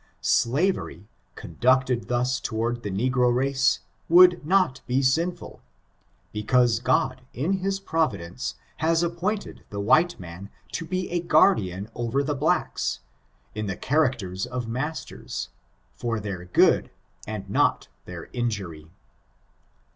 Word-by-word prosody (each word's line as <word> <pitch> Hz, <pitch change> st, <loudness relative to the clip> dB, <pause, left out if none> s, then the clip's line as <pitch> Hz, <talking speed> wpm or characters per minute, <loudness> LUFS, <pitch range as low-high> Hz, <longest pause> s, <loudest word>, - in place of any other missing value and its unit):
Slavery, 130 Hz, -, +1 dB, 0.3 s
conducted 130 Hz, -1 st, +1 dB
thus 125 Hz, +1 st, 0 dB
toward 120 Hz, +1 st, -2 dB
the 105 Hz, -, -4 dB
negro 125 Hz, +5 st, +2 dB
race, 135 Hz, +2 st, +2 dB, 0.3 s
would 175 Hz, 0 st, +7 dB
not 180 Hz, -4 st, +2 dB
be 130 Hz, +2 st, +1 dB
sinful; 170 Hz, +7 st, -1 dB, 0.7 s
be 105 Hz, -, -3 dB
cause 120 Hz, -1 st, +3 dB
God, 130 Hz, +1 st, +1 dB
in 175 Hz, +10 st, 0 dB
his 195 Hz, +1 st, -1 dB
providence, 130 Hz, -, -2 dB, 0.2 s
has 165 Hz, +2 st, +2 dB
appointed 175 Hz, +5 st, -3 dB
the 100 Hz, -, -5 dB
white 155 Hz, +12 st, +3 dB
man 90 Hz, +2 st, -9 dB, 0.2 s
to 165 Hz, -, -4 dB
be 185 Hz, +1 st, -2 dB
a 175 Hz, -, +1 dB
guardian 110 Hz, -, +3 dB
over 120 Hz, +4 st, -1 dB
the 145 Hz, +1 st, -1 dB
blacks, 145 Hz, +3 st, 0 dB, 0.5 s
in 105 Hz, -1 st, -3 dB
the 95 Hz, -, -3 dB
characters 125 Hz, -11 st, 0 dB
of 125 Hz, -2 st, -4 dB
masters, 135 Hz, +7 st, -4 dB, 0.4 s
for 115 Hz, -2 st, -2 dB
their 100 Hz, -4 st, -5 dB
good 90 Hz, -, +3 dB, 0.4 s
and 105 Hz, -2 st, -5 dB
not -, -, +1 dB, 0.2 s
their 90 Hz, -2 st, -8 dB
injury. 100 Hz, -11 st, -3 dB
125 Hz, 125 wpm, -25 LUFS, 110-160 Hz, 0.7 s, would